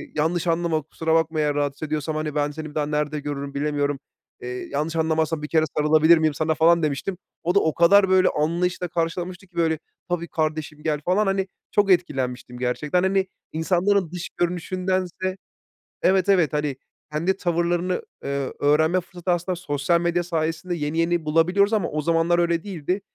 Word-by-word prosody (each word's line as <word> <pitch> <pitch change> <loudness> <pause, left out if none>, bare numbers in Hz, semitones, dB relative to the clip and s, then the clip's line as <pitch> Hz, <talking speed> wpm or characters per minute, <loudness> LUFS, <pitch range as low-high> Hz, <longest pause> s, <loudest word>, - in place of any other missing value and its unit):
yanlış 165 +3 0
anlama, 165 -1 +1
kusura 160 +2 -2
bakma 160 -1 +1
eğer 150 -1 +1
rahatsız 145 +1 -2
ediyorsam, 155 0 -2
hani, 155 -1 -3
ben 145 0 +1
seni 155 +1 -7
bir 150 - -16
daha 150 -1 +1
nerede 150 0 -1
görürüm, 140 -1 -5
bilemiyorum. 145 -1 -1 0.4
Eee, 125 - -5 0.2
yanlış 155 +3 -2
anlamazsan, 160 -1 0
bir - - -3
kere 155 0 +2
sarılabilir 155 +2 +5
miyim 155 -1 +2
sana?" 155 +2 0
falan 170 +1 +4
demiştim. 155 +5 -2 0.3
O 175 +3 0
da - - +7
o 160 - +1
kadar, 190 +3 +5
böyle, 185 0 +5
anlayışla 175 +4 0
karşılamıştı 175 +2 -3
ki, 180 - -31
böyle, 160 -2 +1 0.3
"tabii 170 -1 -1
kardeşim 155 -1 -3
gel." 150 -2 0
falan, 190 +4 +2
hani, 195 0 0 0.2
çok 200 -2 +3
etkilenmiştim 130 -8 0
gerçekten. 150 +8 0
Hani, 190 0 +2 0.2
insanların 180 +2 +1
dış 180 -1 -5
görünüşündense 185 +1 -1 0.7
Evet, 190 0 +3
evet, 180 -7 +4
hani 150 -3 -1 0.4
kendi 170 +5 0
tavırlarını, 175 0 0 0.2
ııı, 140 -1 -2
öğrenme 160 +5 +3
fırsatı 180 0 -6
aslında 175 +1 0
sosyal 150 +1 0
medya 175 0 +1
sayesinde 165 +1 -2
yeni 150 0 -2
yeni 170 0 +1
bulabiliyoruz 180 +7 +3
ama 215 -3 +1
o 155 - -1
zamanlar 165 +2 +2
öyle 170 -1 +1
değildi. 185 -1 -2
165 Hz, 170 wpm, -23 LUFS, 150-180 Hz, 0.7 s, da